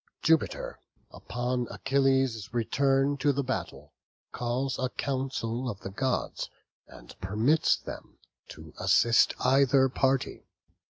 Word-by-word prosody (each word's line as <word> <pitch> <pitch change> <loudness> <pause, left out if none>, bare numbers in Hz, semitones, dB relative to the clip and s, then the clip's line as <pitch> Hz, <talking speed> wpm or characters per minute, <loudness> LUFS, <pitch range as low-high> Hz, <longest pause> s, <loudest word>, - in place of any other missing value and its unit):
Jupiter, 160 -1 +1 0.3
upon 125 0 -3
Achilles' 135 -6 +1
return 135 +4 +1
to 145 +1 +2
the 140 0 -1
battle, 130 0 -5 0.4
calls 125 +3 -2
a 130 0 0
council 130 -2 -3
of 100 -4 -6
the 95 - -6
gods 130 +5 -2 0.4
and - - -14
permits 110 +12 +2
them - - -10 0.3
to 80 0 -12
assist 110 +5 +4
either 135 0 +4
party. 135 +1 -1
130 Hz, 110 wpm, -28 LUFS, 115-135 Hz, 0.4 s, assist